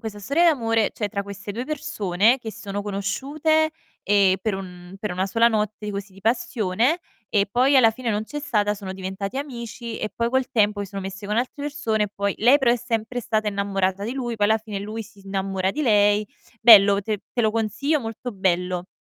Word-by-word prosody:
questa 220 Hz, -2 st, -6 dB
storia 280 Hz, -, +1 dB
d'amore, 230 Hz, -9 st, +2 dB
cioè 210 Hz, -, -3 dB
tra 200 Hz, 0 st, -3 dB
queste 200 Hz, 0 st, -7 dB
2 240 Hz, +4 st, -4 dB
persone 245 Hz, -, +1 dB
che 225 Hz, -2 st, -6 dB
sono 205 Hz, 0 st, -5 dB
conosciute, 280 Hz, +11 st, 0 dB, 0.3 s
ehm, 200 Hz, -2 st, +4 dB
per 215 Hz, 0 st, -1 dB
un 180 Hz, -1 st, -9 dB
per 210 Hz, -1 st, -3 dB
una 185 Hz, +2 st, -1 dB
sola 230 Hz, +4 st, +4 dB
notte, 210 Hz, -1 st, -2 dB
così, 200 Hz, -1 st, -6 dB
di 195 Hz, -, -16 dB
passione, 230 Hz, -, +1 dB, 0.3 s
e 200 Hz, -2 st, +2 dB
poi 260 Hz, +4 st, +4 dB
alla 235 Hz, -4 st, +6 dB
fine 235 Hz, +1 st, -4 dB
non 210 Hz, +1 st, -1 dB
c'è 295 Hz, +5 st, -6 dB
stata, 210 Hz, -8 st, 0 dB
sono 195 Hz, -2 st, -7 dB
diventati 190 Hz, +4 st, -5 dB
amici, 235 Hz, -4 st, -6 dB
e 215 Hz, -, -3 dB
poi 235 Hz, 0 st, 0 dB
col 260 Hz, +1 st, 0 dB
tempo 210 Hz, -3 st, +2 dB
si 200 Hz, -, -3 dB
sono 195 Hz, 0 st, -6 dB
messi 195 Hz, +1 st, -7 dB
con 210 Hz, +2 st, -1 dB
altre 255 Hz, +4 st, -2 dB
persone, 235 Hz, -8 st, 0 dB
e 210 Hz, -, -5 dB
poi 200 Hz, 0 st, -1 dB
lei 250 Hz, +6 st, +6 dB
però 240 Hz, -4 st, +3 dB
è -, -, +2 dB
sempre 235 Hz, 0 st, -3 dB
stata 215 Hz, -2 st, 0 dB
innamorata 200 Hz, -1 st, -1 dB
di 230 Hz, -, -3 dB
lui, 240 Hz, -3 st, -3 dB
poi 205 Hz, -, +2 dB
alla 220 Hz, +1 st, +3 dB
fine 215 Hz, -2 st, -6 dB
lui 215 Hz, +2 st, -5 dB
si 210 Hz, -1 st, -17 dB
innamora 195 Hz, -1 st, -1 dB
di 300 Hz, +8 st, -3 dB
lei. 210 Hz, -3 st, +3 dB, 0.3 s
Bello, 200 Hz, -3 st, +8 dB
te 210 Hz, +1 st, -3 dB
te 245 Hz, -, 0 dB
lo 220 Hz, -, +3 dB
consiglio, 230 Hz, +7 st, 0 dB
molto 225 Hz, +2 st, -6 dB
bello. 180 Hz, -2 st, 0 dB
215 Hz, 210 wpm, -23 LUFS, 200-240 Hz, 0.3 s, Bello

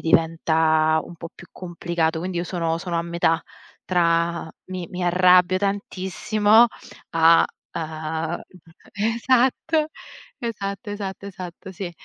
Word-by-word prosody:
diventa 160 Hz, -1 st, +3 dB
un -, -, -11 dB
po' 165 Hz, 0 st, -8 dB
più 175 Hz, -, -14 dB
complicato. 170 Hz, -2 st, -2 dB
Quindi 180 Hz, +1 st, -4 dB
io 175 Hz, -, -1 dB
sono 165 Hz, -2 st, -1 dB
sono 170 Hz, -1 st, -2 dB
a -, -, 0 dB
metà 170 Hz, -1 st, +1 dB, 0.4 s
tra 170 Hz, -2 st, +1 dB, 0.2 s
mi 185 Hz, -2 st, -6 dB
mi 180 Hz, 0 st, -4 dB
arrabbio 180 Hz, +1 st, +5 dB
tantissimo 205 Hz, +3 st, +2 dB, 0.4 s
a 165 Hz, 0 st, +6 dB, 0.3 s
a 160 Hz, +1 st, -3 dB, 0.5 s
esatto, 255 Hz, +8 st, +1 dB, 0.5 s
esatto, 205 Hz, -2 st, -4 dB
esatto, 200 Hz, -1 st, -5 dB
esatto, 185 Hz, -1 st, -9 dB
sì. 185 Hz, -2 st, -5 dB
175 Hz, 115 wpm, -23 LUFS, 165-195 Hz, 0.5 s, a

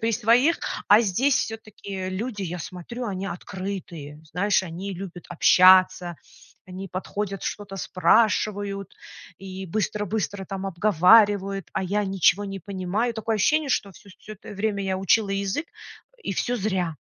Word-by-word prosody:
при 225 Hz, 0 st, 0 dB
своих, 245 Hz, +9 st, +3 dB, 0.3 s
а 210 Hz, +3 st, +7 dB
здесь 250 Hz, +8 st, +2 dB
всё-таки 200 Hz, -4 st, -5 dB
люди, 210 Hz, +3 st, -4 dB
я 175 Hz, 0 st, -4 dB
смотрю, 185 Hz, +10 st, -7 dB
они 195 Hz, -1 st, -4 dB
открытые. 180 Hz, -6 st, -7 dB
Знаешь, 190 Hz, +5 st, +1 dB
они 185 Hz, +3 st, -6 dB
любят 180 Hz, -1 st, -8 dB
общаться, 185 Hz, 0 st, +5 dB, 0.5 s
они 185 Hz, +1 st, -8 dB
подходят, 195 Hz, +2 st, -4 dB
что-то 205 Hz, -2 st, -5 dB
спрашивают 200 Hz, 0 st, +1 dB, 0.4 s
и 190 Hz, 0 st, -7 dB
быстро-быстро 205 Hz, 0 st, -2 dB
там 195 Hz, -1 st, -5 dB
обговаривают, 195 Hz, +1 st, +4 dB
а -, -, -1 dB
я 205 Hz, +3 st, 0 dB
ничего 195 Hz, +1 st, +2 dB
не 195 Hz, -1 st, -6 dB
понимаю. 200 Hz, +5 st, -2 dB
Такое 220 Hz, 0 st, -2 dB
ощущение, 300 Hz, +8 st, +2 dB
что 200 Hz, -6 st, 0 dB
всё 200 Hz, -, -17 dB
всё 215 Hz, -, -9 dB
это 195 Hz, -, -13 dB
время 200 Hz, 0 st, -1 dB
я 190 Hz, -1 st, -1 dB
учила 195 Hz, +2 st, +2 dB
язык, 200 Hz, +10 st, -2 dB
э, -, -, -18 dB
и -, -, -3 dB
всё 240 Hz, +6 st, -1 dB
зря. 190 Hz, -6 st, -1 dB
195 Hz, 145 wpm, -24 LUFS, 185-215 Hz, 0.5 s, а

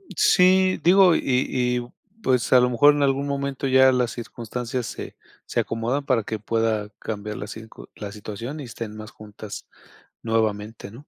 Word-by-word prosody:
Sí, 185 Hz, 0 st, +4 dB
digo, 180 Hz, 0 st, +6 dB
y -, -, +2 dB
y, 125 Hz, -2 st, 0 dB, 0.3 s
pues, 125 Hz, -, +1 dB
a 125 Hz, -, +8 dB
lo 125 Hz, 0 st, +3 dB
mejor 145 Hz, +4 st, +5 dB
en 145 Hz, -1 st, 0 dB
algún 140 Hz, +1 st, +1 dB
momento 140 Hz, -1 st, -2 dB
ya 130 Hz, 0 st, +6 dB
las 125 Hz, -2 st, 0 dB
circunstancias 120 Hz, +1 st, -5 dB
se -, -, -7 dB, 0.3 s
se -, -, -1 dB
acomodan, 120 Hz, +5 st, -1 dB
para 125 Hz, -6 st, +1 dB
que 110 Hz, 0 st, -4 dB
pueda 110 Hz, -1 st, -1 dB
cambiar 105 Hz, -1 st, -5 dB
la 105 Hz, -, -6 dB
circu 110 Hz, +1 st, -11 dB
la 100 Hz, -2 st, -7 dB
situación, 110 Hz, +7 st, -7 dB
y -, -, -6 dB
estén 115 Hz, -3 st, -7 dB
más 110 Hz, 0 st, -9 dB
juntas 105 Hz, -1 st, -10 dB, 0.6 s
nuevamente, 110 Hz, -2 st, -2 dB
¿no? -, -, -15 dB
120 Hz, 170 wpm, -23 LUFS, 110-135 Hz, 0.6 s, a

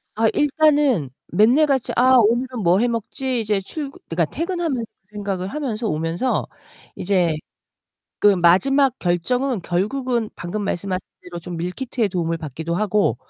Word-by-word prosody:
아, 225 Hz, +1 st, +3 dB
일단은 290 Hz, -, +3 dB, 0.2 s
맨날 235 Hz, -, +4 dB
같이 265 Hz, -3 st, 0 dB
"아, 255 Hz, +1 st, +5 dB
오늘은 240 Hz, +1 st, +2 dB
뭐 175 Hz, +3 st, +4 dB
해 245 Hz, -, +2 dB
먹지?" 240 Hz, +2 st, -2 dB
이제 210 Hz, -2 st, 0 dB
출근 280 Hz, +7 st, -7 dB
그러니까 165 Hz, 0 st, +1 dB
퇴근하면서 330 Hz, -8 st, -2 dB, 0.2 s
생각을 200 Hz, -3 st, -4 dB
하면서 230 Hz, -2 st, -3 dB
오면서 165 Hz, +10 st, -1 dB, 0.5 s
이제 175 Hz, -4 st, +1 dB, 0.8 s
그 -, -, +2 dB
마지막 255 Hz, +11 st, +4 dB
결정은 235 Hz, +7 st, 0 dB
결국은 230 Hz, +5 st, -1 dB
방금 190 Hz, +5 st, -4 dB
말씀하신 185 Hz, -1 st, -2 dB, 0.2 s
대로 175 Hz, -1 st, -8 dB
좀 175 Hz, 0 st, -7 dB
밀키트의 215 Hz, +6 st, -2 dB
도움을 170 Hz, -3 st, -1 dB
받기도 160 Hz, +2 st, -4 dB
하고 205 Hz, -, +1 dB
215 Hz, 320 characters per minute, -21 LUFS, 175-260 Hz, 0.8 s, 아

